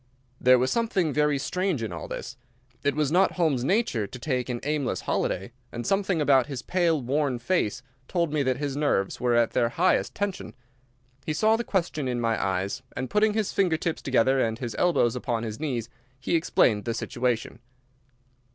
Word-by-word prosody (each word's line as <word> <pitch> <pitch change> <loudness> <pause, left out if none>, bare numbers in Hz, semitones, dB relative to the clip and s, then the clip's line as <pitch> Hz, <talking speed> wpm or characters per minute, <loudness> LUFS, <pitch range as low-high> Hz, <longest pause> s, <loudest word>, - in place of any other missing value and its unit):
There 125 0 +6
was 130 +1 +1
something 195 -9 +1
very 150 -1 +2
strange 180 -1 -1
in 105 -5 -4
all 80 - -6
this. - - -6 0.5
It 140 -1 +1
was 150 -2 0
not 185 +3 +3
Holmes's 155 -8 +1
nature 140 - +1
to 125 - -9
take 125 -1 -2
an 120 -1 -2
aimless 150 -2 -1
holiday, 95 +6 -2 0.2
and 120 0 -5
something 195 - +1
about 140 -3 +4
his 135 -4 -5
pale, 170 -4 +1
worn 135 +1 0
face 120 - -1 0.2
told 170 -4 0
me 150 - +1
that 130 -2 +1
his 145 -1 -3
nerves 140 -10 0
were 120 -1 +2
at 120 -1 +3
their 120 -2 +2
highest 175 +9 +1
tension. 205 -2 -3 0.7
He 155 - -2
saw 220 +7 +3
the 235 - -2
question 170 - -1
in 125 -1 -1
my 115 -1 0
eyes, 95 +4 -1 0.2
and, 130 +1 -3
putting 210 0 +3
his 215 -3 -1
finger 180 -5 +2
tips 165 0 -3
together 130 0 +2
and 110 -3 0
his 120 -2 -5
elbows 165 -10 +3
upon 120 -2 -2
his 110 -1 -5
knees, 125 -7 -2 0.3
he 135 - -1
explained 115 -9 +2
the 115 -1 -1
situation. 120 -2 -2
135 Hz, 190 wpm, -26 LUFS, 120-170 Hz, 0.7 s, There